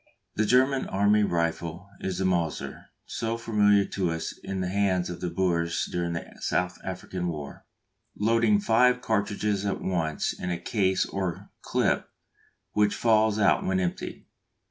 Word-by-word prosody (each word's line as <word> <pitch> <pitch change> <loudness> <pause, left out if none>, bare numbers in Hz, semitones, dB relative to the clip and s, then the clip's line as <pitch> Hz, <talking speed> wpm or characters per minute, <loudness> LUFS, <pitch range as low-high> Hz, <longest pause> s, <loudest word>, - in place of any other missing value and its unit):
The 110 0 +1
German 130 +2 +3
army 100 +2 +3
rifle 85 -1 -1
is 95 -2 -3
the 95 - 0
Mauser, 85 -4 -1 0.2
so 115 0 -3
familiar 105 -3 +3
to 95 -3 -1
us 80 0 -3
in 95 -1 -3
the 90 - -1
hands 95 -2 +1
of 90 - -8
the 90 - -1
Boers 85 -1 0
during 85 -1 -2
the 85 - -4
South 90 0 -1
African 90 -1 -4
War 75 -4 -6 0.5
loading 110 -1 +3
five 125 +4 +4
cartridges 100 -2 0
at 100 -1 -1
once 80 -5 -1
in 90 - -5
a 85 - -1
case 95 +1 +1
or 95 -4 -4
"clip" - - 0 0.6
which 105 -1 +2
falls 110 -2 +3
out 100 -3 +3
when 95 0 +1
emptied. 90 -1 -3
95 Hz, 150 wpm, -27 LUFS, 90-105 Hz, 0.6 s, five